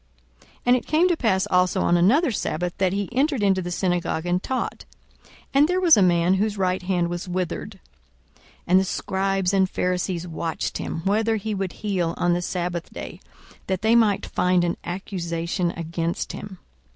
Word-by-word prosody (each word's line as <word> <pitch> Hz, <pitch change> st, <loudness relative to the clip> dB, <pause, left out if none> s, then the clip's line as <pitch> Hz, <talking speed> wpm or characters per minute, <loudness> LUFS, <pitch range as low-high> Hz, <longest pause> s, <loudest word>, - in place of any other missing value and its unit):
42:006:006 -, -, -25 dB, 0.2 s
And 245 Hz, 0 st, +5 dB
it -, -, -7 dB
came 325 Hz, +4 st, +3 dB
to 350 Hz, -, +3 dB
pass 195 Hz, -10 st, +1 dB
also 180 Hz, 0 st, +3 dB
on 175 Hz, -, +3 dB
another 245 Hz, -, +4 dB
sabbath, 175 Hz, -4 st, -2 dB
that 190 Hz, -2 st, +2 dB
he 200 Hz, 0 st, -2 dB
entered 270 Hz, -1 st, +1 dB
into 190 Hz, -2 st, +3 dB
the 175 Hz, -, -5 dB
synagogue 175 Hz, -2 st, -1 dB
and 175 Hz, +1 st, 0 dB
taught: 260 Hz, +4 st, -3 dB, 0.7 s
and 280 Hz, +2 st, +5 dB
there 360 Hz, +2 st, +1 dB
was 350 Hz, -3 st, +7 dB
a 205 Hz, -, +3 dB
man 175 Hz, 0 st, +3 dB
whose 205 Hz, +2 st, 0 dB
right 185 Hz, -1 st, 0 dB
hand 180 Hz, -2 st, 0 dB
was 175 Hz, +1 st, -5 dB
withered. 180 Hz, -1 st, -4 dB, 0.6 s
42:006:007 -, -, -29 dB, 0.2 s
And 185 Hz, +2 st, +5 dB
the -, -, +2 dB
scribes 195 Hz, 0 st, -1 dB
and 190 Hz, -1 st, +3 dB
Pharisees 180 Hz, -1 st, -2 dB
watched 165 Hz, 0 st, -3 dB
him, 165 Hz, -, -4 dB
whether 220 Hz, +3 st, +2 dB
he 215 Hz, 0 st, -3 dB
would 195 Hz, -2 st, -3 dB
heal 185 Hz, -6 st, -2 dB
on 175 Hz, 0 st, +2 dB
the 175 Hz, -, 0 dB
sabbath 175 Hz, -1 st, -3 dB
day; -, -, -8 dB, 0.5 s
that 190 Hz, 0 st, -2 dB
they 220 Hz, +1 st, +4 dB
might 220 Hz, -4 st, +3 dB
find 180 Hz, -1 st, +1 dB
an 170 Hz, -1 st, -1 dB
accusation 175 Hz, -1 st, -3 dB
against 170 Hz, 0 st, -3 dB
him. 195 Hz, -2 st, -8 dB
185 Hz, 185 wpm, -24 LUFS, 175-205 Hz, 0.7 s, was